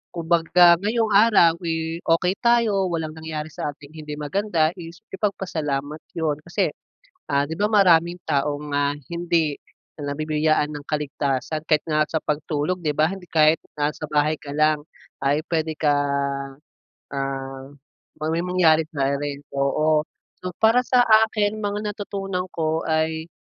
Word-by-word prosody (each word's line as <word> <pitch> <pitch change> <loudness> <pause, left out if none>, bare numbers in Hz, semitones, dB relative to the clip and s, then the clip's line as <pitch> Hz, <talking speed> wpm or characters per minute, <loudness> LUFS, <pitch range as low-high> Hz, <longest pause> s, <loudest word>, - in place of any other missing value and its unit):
kumbaga 170 +1 +4
ngayong 220 +2 0
araw, 200 -6 +5
eh, 165 0 -2
okey 180 +3 +2
tayo, 230 -5 +3
walang 160 -3 -3
nangyari 155 -1 -6
sa 145 - -4
ating 145 0 -15
hindi 155 -1 -7
maganda, 160 +2 0
is 170 +4 -10
ipagpasalamat 155 -8 -3 0.2
yun. 155 -3 -1
Kasi, 175 - 0 0.6
ah, 140 0 +2
di 155 - -5
ba, 205 +6 0
maraming 175 -5 +4
tao 145 -1 0 0.2
nga 145 0 +2 0.2
hindi 170 -1 0 0.5
nabibiyayaan 150 +1 0
ng 145 -1 -8
kaligtasan 145 0 -2
kahit 155 -2 +3
nga 155 -1 +1
sa 160 0 -2
pagtulog, 150 +3 -1
di 155 -4 -1
ba, 155 +3 +2
hindi 190 -2 -8
kahit 155 0 +4 0.2
na 150 0 0
sa 155 - -7
bahay 150 +1 +1
ka 145 0 -8
lang 155 0 +3 0.4
ay 140 +3 +1
pwede 160 -1 0
ka, 150 -1 +2 1.2
ah, 135 -1 -4 0.5
'pag 155 +1 -3
may 165 +2 -1
mangyari 165 -3 +3
sa'yo 140 0 0
rin, 145 0 -4 0.2
oo. 155 +2 +2 0.3
So, 180 -1 -6
para 240 +3 +4
sa 250 -1 +4
akin, 220 -2 +3
mga 210 0 -2
natutunan 195 -3 -4
ko 160 0 -1
ay, 160 0 0
160 Hz, 145 wpm, -23 LUFS, 150-180 Hz, 1.2 s, araw